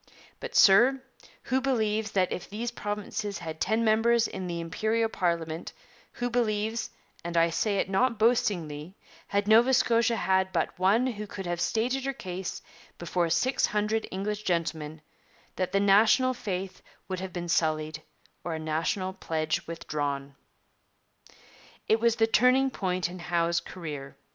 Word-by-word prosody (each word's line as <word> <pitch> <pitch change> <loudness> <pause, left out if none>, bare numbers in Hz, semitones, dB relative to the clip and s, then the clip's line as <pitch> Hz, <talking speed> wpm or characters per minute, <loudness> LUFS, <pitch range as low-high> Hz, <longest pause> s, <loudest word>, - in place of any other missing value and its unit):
But, - - -7
sir, 240 +7 +6 0.4
who 260 +2 0
believes 220 -5 0
that 185 -2 +2
if - - -5
these 230 +4 -4
provinces 210 -1 -4
had 160 -1 -7
ten 220 +3 +1
members 225 +1 +3
in 190 -1 -6
the 170 -1 -3
Imperial 220 +7 0
parliament, 170 -4 -2 0.4
who 245 - -2
believes 225 -2 -1 0.3
and 170 0 -3
I 165 0 +4
say 200 +4 0
it - - 0
not 230 +5 +1
boastingly 185 -8 0 0.3
had 200 0 0
Nova 235 +4 +6
Scotia 235 -2 +3
had 190 -2 +1
but 170 0 -2
one 200 +7 +3
who 210 -5 -4
could 195 -1 -7
have 175 0 -2
stated 250 +4 0
her 275 - -1
case 185 -6 -6 0.3
before 175 0 -1
six 255 +10 +2
hundred 210 +1 -1
English 210 +2 -3
gentlemen, 160 -4 -2 0.5
that 185 - -2
the 195 - +2
national 215 +6 +4
faith 190 -5 -5 0.3
would 185 -1 -3
have 190 0 -5
been 175 -1 -5
sullied 155 -1 0 0.4
or 170 -2 -3
a - - -4
national 165 +5 -1
pledge 160 -4 -2
withdrawn?' 145 -4 -3 1.5
It 220 - +3
was 230 0 +3
the 225 - +3
turning 255 +4 +4
point 185 -5 -1
in 180 +1 -9
Howe's 170 0 0
career. 150 -7 -8
195 Hz, 150 wpm, -28 LUFS, 170-225 Hz, 1.5 s, sir